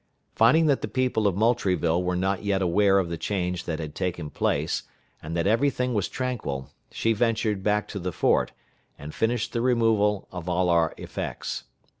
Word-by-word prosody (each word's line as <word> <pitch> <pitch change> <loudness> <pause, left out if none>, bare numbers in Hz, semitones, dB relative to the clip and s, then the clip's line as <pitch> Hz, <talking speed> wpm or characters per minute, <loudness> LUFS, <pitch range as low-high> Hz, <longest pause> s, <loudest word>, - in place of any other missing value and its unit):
Finding 155 +9 +5
that 145 -3 +2
the - - -2
people 125 -5 +1
of 95 - +1
Moultrieville 95 -7 +2
were 90 0 -1
not 95 +2 -1
yet 100 -1 +1
aware 100 +2 +4
of 95 -3 +1
the 85 -1 -4
change 90 -3 -2
that 80 -2 -2
had 80 -2 -6
taken 85 -3 -3
place, - - 0 0.4
and 80 +2 -4
that 85 - 0
every 115 +8 +3
thing 125 -1 -2
was 105 -4 0
tranquil, 115 - -4 0.2
she 115 - 0
ventured 110 -3 0
back 105 +1 +1
to 100 - -5
the 90 0 -3
fort, - - +2 0.5
and 75 +2 -8
finished 110 0 -1
the 115 - 0
removal 115 -5 +2
of 90 -1 -6
all 90 0 +1
our 85 -2 +2
effects. - - -5
100 Hz, 185 wpm, -26 LUFS, 85-115 Hz, 0.5 s, Finding